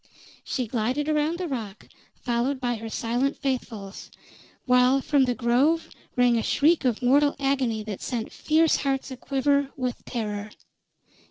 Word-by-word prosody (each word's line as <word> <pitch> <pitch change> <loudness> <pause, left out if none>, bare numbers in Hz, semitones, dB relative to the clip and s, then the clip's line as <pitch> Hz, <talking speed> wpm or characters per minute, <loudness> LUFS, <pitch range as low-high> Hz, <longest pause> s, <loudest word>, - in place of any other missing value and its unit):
She 255 - -2
glided 245 +6 -1
around 310 +2 +1
the 360 -1 -3
rock, 220 -8 -6 0.3
followed 250 +3 -1
by 245 -2 -1
her 225 +1 -7
silent 240 +5 -1
faithfuls, 230 -7 -4 0.6
while 250 +1 +4
from 275 0 +2
the 245 -1 -1
Grove 260 +8 +2 0.3
rang 245 -2 +4
a - - 0
shriek 310 +8 +2
of 245 -1 0
mortal 285 +3 +4
agony 265 -6 0
that 210 -3 -6
sent 235 -3 -3
fierce 315 +1 +2
hearts 270 -1 -2
aquiver 275 +2 0
with 250 -2 -3
terror. 210 -3 -4
255 Hz, 145 wpm, -25 LUFS, 235-280 Hz, 0.6 s, while